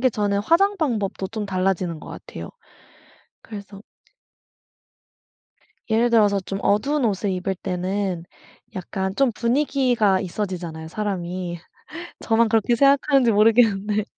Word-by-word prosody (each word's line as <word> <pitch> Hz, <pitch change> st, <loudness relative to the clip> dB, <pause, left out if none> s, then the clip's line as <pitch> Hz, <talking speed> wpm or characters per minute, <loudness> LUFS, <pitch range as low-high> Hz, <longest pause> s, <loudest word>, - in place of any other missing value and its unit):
게 255 Hz, 0 st, +3 dB
저는 205 Hz, -2 st, 0 dB
화장 390 Hz, -, +3 dB
방법도 210 Hz, -, -2 dB
좀 215 Hz, -1 st, -4 dB
달라지는 185 Hz, -3 st, -1 dB
것 -, -, -11 dB
같아요. -, -, -9 dB, 0.9 s
그래서 200 Hz, -2 st, -10 dB, 2.1 s
예를 230 Hz, +2 st, +3 dB
들어서 210 Hz, -4 st, +3 dB
좀 195 Hz, +1 st, -5 dB
어두운 270 Hz, +8 st, +1 dB
옷을 205 Hz, -2 st, 0 dB
입을 185 Hz, +1 st, -2 dB
때는 185 Hz, -1 st, -3 dB, 0.5 s
약간 190 Hz, +1 st, -4 dB
좀 275 Hz, +1 st, +2 dB
분위기가 245 Hz, -5 st, +2 dB
있어지잖아요 175 Hz, -4 st, -5 dB
사람이. 180 Hz, -2 st, -4 dB, 0.6 s
저만 225 Hz, 0 st, +2 dB
그렇게 225 Hz, +1 st, +2 dB
생각하는지 275 Hz, -2 st, +4 dB
모르겠는데. 210 Hz, -1 st, +3 dB
205 Hz, 280 characters per minute, -22 LUFS, 190-235 Hz, 2.1 s, 생각하는지